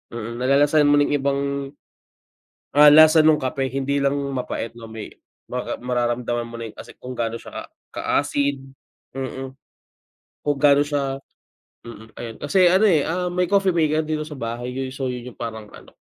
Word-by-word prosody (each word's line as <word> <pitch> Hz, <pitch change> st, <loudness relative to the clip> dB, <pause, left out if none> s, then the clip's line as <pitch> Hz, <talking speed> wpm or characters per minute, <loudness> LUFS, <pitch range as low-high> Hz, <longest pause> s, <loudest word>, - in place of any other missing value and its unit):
mm, 115 Hz, 0 st, -5 dB
nalalasahan 145 Hz, +3 st, +3 dB
mo 145 Hz, -, +5 dB
na 145 Hz, -, +4 dB
yung 145 Hz, -, +1 dB
ibang, 140 Hz, 0 st, 0 dB, 1.4 s
ah, 150 Hz, 0 st, +9 dB
lasa 155 Hz, 0 st, +7 dB
nung 155 Hz, -1 st, +4 dB
kape. 135 Hz, +1 st, -1 dB
Hindi 135 Hz, +1 st, -1 dB
lang 140 Hz, -, +2 dB, 0.2 s
mapait 125 Hz, -2 st, -4 dB
na 115 Hz, -, -10 dB
may 110 Hz, -1 st, -8 dB, 0.4 s
maka 125 Hz, 0 st, -3 dB
mararamdaman 120 Hz, -1 st, -1 dB
mo 115 Hz, -, -10 dB
na 115 Hz, -, -5 dB
yung -, -, -17 dB
kasi -, -, -10 dB
kung 125 Hz, -1 st, -7 dB
gano 115 Hz, -1 st, -2 dB
siya -, -, -8 dB, 0.2 s
ka-acid, 140 Hz, -1 st, -1 dB, 0.6 s
mm, 130 Hz, 0 st, -5 dB, 0.9 s
kung 145 Hz, -1 st, -1 dB
gaano 145 Hz, 0 st, +5 dB
siya, 140 Hz, -2 st, -2 dB, 0.6 s
mm, 110 Hz, -1 st, -11 dB
ayun 115 Hz, -2 st, -7 dB
kasi 180 Hz, +4 st, +4 dB
ano, 190 Hz, +4 st, +4 dB
eh, 165 Hz, -8 st, +4 dB
ah, 180 Hz, +2 st, -1 dB
may 180 Hz, 0 st, 0 dB
coffee 195 Hz, -2 st, +3 dB
maker 155 Hz, -1 st, +1 dB
dito 155 Hz, 0 st, -2 dB
sa 150 Hz, -3 st, -9 dB
bahay 120 Hz, +1 st, -4 dB
yung 130 Hz, 0 st, -4 dB
so 135 Hz, -2 st, -3 dB
yun 125 Hz, 0 st, -7 dB
yung -, -, -33 dB
parang 110 Hz, -2 st, -5 dB
ano -, -, -14 dB
135 Hz, 175 wpm, -22 LUFS, 120-150 Hz, 1.4 s, ah